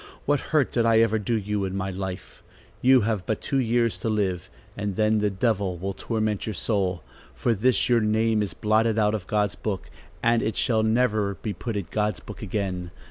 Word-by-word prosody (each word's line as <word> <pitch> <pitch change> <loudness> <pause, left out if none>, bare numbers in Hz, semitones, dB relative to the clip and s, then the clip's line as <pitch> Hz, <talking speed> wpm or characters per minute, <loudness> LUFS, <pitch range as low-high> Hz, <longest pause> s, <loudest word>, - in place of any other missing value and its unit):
What 145 0 +2
hurt 150 -4 +2
did 120 - +2
I 115 -1 +4
ever 110 -1 +2
do 110 +3 0
you 105 -1 -2
in 95 0 -3
my 95 0 -2
life? 95 0 -6 0.4
You 130 0 +6
have 105 -3 -1
but 110 - 0
two 135 - -1
years 115 -2 +1
to 115 - -2
live, 100 -5 -1 0.3
and 100 -1 -3
then 110 +1 +2
the 105 0 +2
devil 100 -2 0
will 95 +3 -3
torment 110 0 -2
your 110 - -3
soul, 95 - -1 0.3
for 120 - +1
this 115 +2 +2
your 120 -2 +4
name 110 0 +2
is 100 - -3
blotted 110 +1 +2
out 105 -1 +3
of 100 -4 -4
God's 105 -1 +1
book, 100 -4 -4 0.3
and 115 0 +3
it 110 - -1
shall 110 -2 +2
never 110 -3 +1
be 105 +1 -4
put 110 +5 -5
in 100 - -3
God's 105 -4 0
book 105 - -10
again. 95 -4 -3
105 Hz, 205 wpm, -25 LUFS, 100-115 Hz, 0.4 s, You